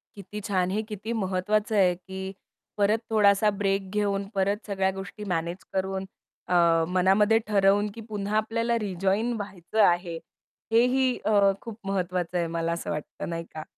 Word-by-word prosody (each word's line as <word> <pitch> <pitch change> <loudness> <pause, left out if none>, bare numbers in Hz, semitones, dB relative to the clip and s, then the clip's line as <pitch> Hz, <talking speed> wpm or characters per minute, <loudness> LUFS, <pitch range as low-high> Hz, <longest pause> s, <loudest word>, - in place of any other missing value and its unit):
किती 205 +1 -8
छान. 185 -2 +1
हे 215 +2 0
किती 210 +2 -5
महत्वाचं 210 +1 0
आहे, 185 -3 +4
की 190 +1 -7 0.5
परत 205 +2 +3
थोडासा 210 -1 +5
ब्रेक 195 -1 0
घेऊन, 200 -1 0
परत 200 +2 0
सगळ्या 190 -1 +1
गोष्टी 195 +2 -8
मॅनेज 170 +2 -3
करून 190 0 -1 0.5
अ, - - +3 0.4
मनामध्ये 195 +4 +4
ठरवून, 205 0 +3
की 230 - -7
पुन्हा 210 0 -1
आपल्याला 230 +2 0
रिजॉइन 195 +3 0
व्हायचं 200 +1 -2
आहे. 175 -1 0 0.5
हेही 250 +2 +3
अ, 210 -1 +4 0.2
खूप 230 -3 -8
महत्वाचं 180 -2 -1
आहे, 170 - 0
मला 165 0 -2
असं 170 - -5
वाटतं 150 +2 -5
नाही 165 0 -3
का? 155 - -6
195 Hz, 150 wpm, -26 LUFS, 185-210 Hz, 0.5 s, थोडासा